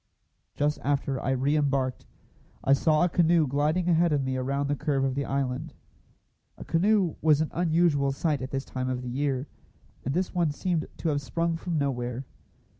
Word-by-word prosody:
Just 150 +1 0
after 140 -1 0
I - - -2
re 135 +3 +1
embarked, 135 -3 0 0.6
I 135 - +4
saw 155 +3 +3
a - - +4
canoe 170 -1 +3
gliding 150 +6 0
ahead 170 -1 +3
of 145 -2 +1
me 130 0 -2
around 135 +2 -1
the 145 - 0
curve 140 -1 0
of 135 -1 +1
the 140 +1 -2
island. 135 -2 -2 0.8
A - - -9
canoe 190 0 +2
was 155 -2 +4
an 155 - -1
unusual 160 -5 +2
sight 145 0 -1
at 130 - -4
this 135 0 -3
time 130 0 -3
of 125 -1 -3
the 125 - -5
year, 135 +1 -1 0.6
and 135 +3 -2
this 185 +1 -1
one 175 -3 +2
seemed 165 +3 -1
to 165 - -1
have 145 -1 0
sprung 165 +6 -1
from 165 0 -3
nowhere. 125 -2 -2
145 Hz, 190 wpm, -27 LUFS, 135-165 Hz, 0.8 s, I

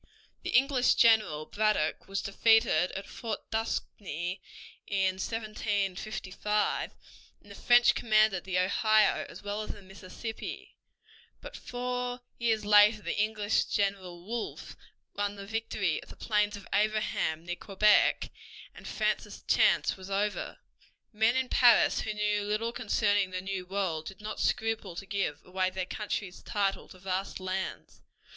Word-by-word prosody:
The - - -5
English 260 -1 +3
general, 215 -10 +4
Braddock, 210 -7 0
was 195 0 -3
defeated 220 -4 +3
at 195 - -5
Fort 225 -3 -6
Duquesne 190 -5 -3 0.5
in 190 -2 +1
1755, 210 -1 -2 0.5
and 205 - -17
the - - -8
French 240 +3 +5
commanded 215 -4 +3
the 185 -1 -2
Ohio 215 +4 +3
as - - -11
well 205 +1 -3
as 215 - -7
the 205 - -12
Mississippi; 195 +4 -8 0.6
but - - -10
four 250 0 -4 0.2
years 225 -3 +1
later 210 +1 +6
the - - -1
English 215 -1 +1
general, 190 -4 -2
Wolfe, 230 +2 -5 0.4
won 205 0 -1
the 200 0 -8
victory 215 -5 -1
of - - -16
the - - -11
Plains 210 -1 0
of 200 - -12
Abraham 205 -6 0
near 175 0 -3
Quebec; 205 +3 +3 0.4
and - - -11
France's - - -2
chance - - +3
was 190 0 -10
over. 205 +1 -2 0.6
Men 220 +3 +3
in 260 0 +1
Paris 240 -2 +5
who 215 - -4
knew 210 0 +1
little 215 +3 -1
concerning 205 -3 +1
the 185 0 -4
new 190 -1 -4
world 180 -5 -2
did 195 - -9
not 215 0 -6
scruple 220 -5 -1
to 195 - -6
give 195 -7 -3
away 185 0 0
their 185 0 -4
country's 200 -1 -4
title 200 -3 -1
to 185 - -14
vast 190 +1 -3
lands. 185 0 -5
205 Hz, 140 wpm, -29 LUFS, 190-220 Hz, 0.6 s, later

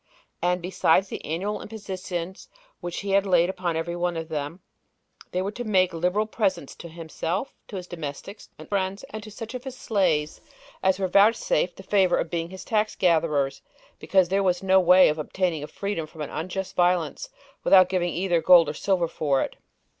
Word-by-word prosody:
And 180 +1 0
besides 185 +1 +2
the - - -6
annual 190 +7 -3
impositions 190 -4 -6 0.3
which 175 0 -5
he 200 0 +3
laid 180 -2 +3
upon 180 -3 -3
every 165 +2 -2
one 175 -1 -1
of 165 0 -5
them, 155 +3 -4 0.7
they 185 +1 -1
were 200 - -2
to 245 +3 -6
make 185 -5 +2
liberal 180 +6 0
presents 210 - -1
to - - -9
himself, 165 - -4
to - - -9
his 180 -2 -5
domestics 170 +4 -8
and - - -11
friends, 195 +1 -2
and 215 - -6
to 210 - -10
such 225 +3 -8
of 250 -1 -6
his 265 -1 -7
slaves 175 - 0 0.4
as 190 -1 +2
were 190 -1 0
vouchsafed 200 -3 +3
the 190 - -11
favor 190 -2 +3
of 165 - -2
being 170 -1 -2
his 190 0 -9
tax 215 -1 0
gatherers, 155 -6 +1 0.4
because 190 -3 +2
there 195 +1 +2
was 180 -1 +1
no 190 0 +5
way 180 +1 +7
of 155 +1 0
obtaining 170 0 -1
a - - -5
freedom 200 -5 -4
from 155 0 -11
unjust 180 +6 -4
violence 180 - +1 0.3
without 185 -2 +7
giving 180 -2 0
either 175 -1 0
gold 170 -4 +7
or - - -3
silver 180 +2 0
for 145 -4 0
it. - - -6
180 Hz, 185 wpm, -25 LUFS, 165-195 Hz, 0.7 s, way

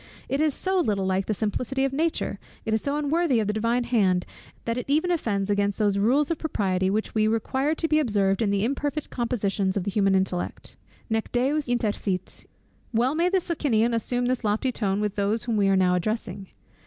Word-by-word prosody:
It 275 +2 0
is 310 -3 +2
so 380 0 0
little 205 - 0
like 190 0 0
the 215 - +1
simplicity 250 +6 -1
of 270 - -2
nature, 320 +3 -1 0.3
it 220 - -1
is 220 - +1
so 285 +1 -1
unworthy 300 -3 +1
of 215 - 0
the 210 - -1
divine 230 +3 +1
hand, 200 -7 +2 0.4
that 230 - -1
it 250 +2 -5
even 315 +5 +2
offends 205 - 0
against 200 0 +1
those 205 -2 +1
rules 275 +9 +2
of 330 - -1
propriety 190 - 0
which 215 +3 -1
we 215 -1 +2
require 265 +7 0
to 325 - -1
be 310 0 +3
observed 200 -7 +1
in 215 - +2
the 200 +1 +1
imperfect 290 +3 -2
compositions 205 -5 -1
of 195 - -1
the 200 - -2
human 195 -1 +2
intellect." 190 -2 -2 0.3
Well 225 -1 0 1.9
may 340 +3 +2
the 380 0 +2
Socinian 245 -10 +1
assume 245 +2 -1
this 250 0 0
lofty 215 +5 +1
tone, 205 -4 -1
with 210 -2 -1
those 205 +2 0
whom 235 -2 -1
we 200 -2 +3
are 195 0 +3
now 180 -1 +3
addressing. 195 0 -2
220 Hz, 195 wpm, -25 LUFS, 200-275 Hz, 1.9 s, be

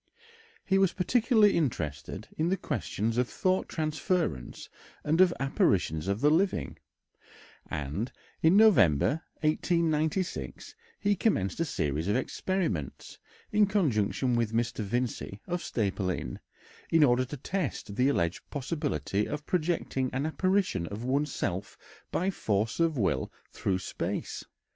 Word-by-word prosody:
He 195 0 +3
was 195 -2 +3
particularly 215 +2 +3
interested 85 - -2
in 160 +2 0
the 190 - +1
questions 115 - -2
of 125 - +1
thought 185 0 0
transference 155 - -2 0.4
and 160 +4 +3
of 185 -2 +6
apparitions 95 - +1
of 100 +3 -1
the 150 +1 +5
living, 165 - +1 0.9
and 75 - -3 0.3
in 165 +5 +5
November, 155 - +5 0.2
1896, 160 +2 0 0.3
he 205 0 +2
commenced 130 - 0
a 165 - +2
series 75 - -1
of 105 - +2
experiments 130 - -2 0.3
in 210 -1 +4
conjunction 130 - +1
with 115 -2 0
Mr. 115 -1 0
Vincey, 110 -2 -2
of 175 0 -2
Staple 100 -4 -1
Inn, 65 -9 -4 0.5
in 165 -2 +5
order 125 -2 +4
to 135 +4 -6
test 145 - -3
the 130 +4 +3
alleged 85 -9 0
possibility 115 - -2
of 150 0 -5
projecting 160 -6 0
an 135 +3 -1
apparition 185 - +1
of 105 +5 -6
one's 140 +3 0
self 95 +2 -3 0.3
by 185 +3 0
force 110 - -1
of 165 -3 +2
will 95 - 0 0.2
through 95 -2 -1
space. 95 - -4
135 Hz, 130 wpm, -29 LUFS, -, 0.9 s, of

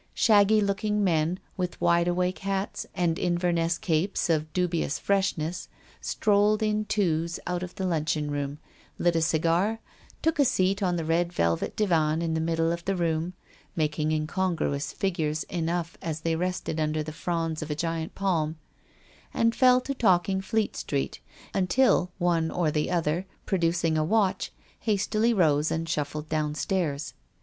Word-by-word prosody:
Shaggy 215 -1 +5
looking 210 +1 0
men, 165 -1 +1 0.2
with 180 -1 -3
wide 170 0 +3
awake 180 +1 0
hats 195 +1 -3
atid 170 -2 +1
Inverness 175 -1 +1
capes 175 +1 0
of 155 -1 0
dubious 170 -4 0
freshness, 180 -4 -1 0.3
strolled 210 0 +2
in 215 0 0
twos 170 -5 0
out 180 0 -2
of 180 -1 -6
the 190 - -3
luncheon 155 -3 0
room, 145 0 -3 0.4
lit 175 -1 +2
a 165 - +2
cigar, 170 +7 +1 0.4
took 320 -2 +1
a - - +7
seat 195 -6 +1
on 180 -2 +1
the 165 -2 -2
red 170 +2 +1
velvet 85 - 0
divan 165 -5 +2
in 165 -1 -1
the 160 - 0
middle 165 0 +1
of 170 0 -3
the 195 - 0
room, 165 0 -1 0.4
making 155 -1 0
incongruous 155 -3 -1
figures 160 -5 -1
enough 170 -1 -2
as 160 -1 -4
they 165 0 0
rested 180 -2 -2
under 155 0 0
the 155 0 -7
fronds 165 -1 -2
of 155 - -5
a 150 - -1
giant 165 +1 -3
palm, 165 -5 0 0.8
and 230 0 +3
fell 250 +1 +5
to 275 - -3
talking 190 -5 +2
Fleet 215 +2 -1
Street, 140 -2 -3 0.3
until 185 0 +3
one 170 -3 +1
or 165 -3 0
the 150 0 0
other, 175 +1 0 0.2
producing 165 -3 +1
a - - +2
watch, 195 +1 +1 0.3
hastily 215 +2 +1
rose 155 -7 +3
and 165 +1 -2
shuffled 150 -1 -3
downstairs. 155 0 -1
170 Hz, 155 wpm, -27 LUFS, 160-190 Hz, 0.8 s, a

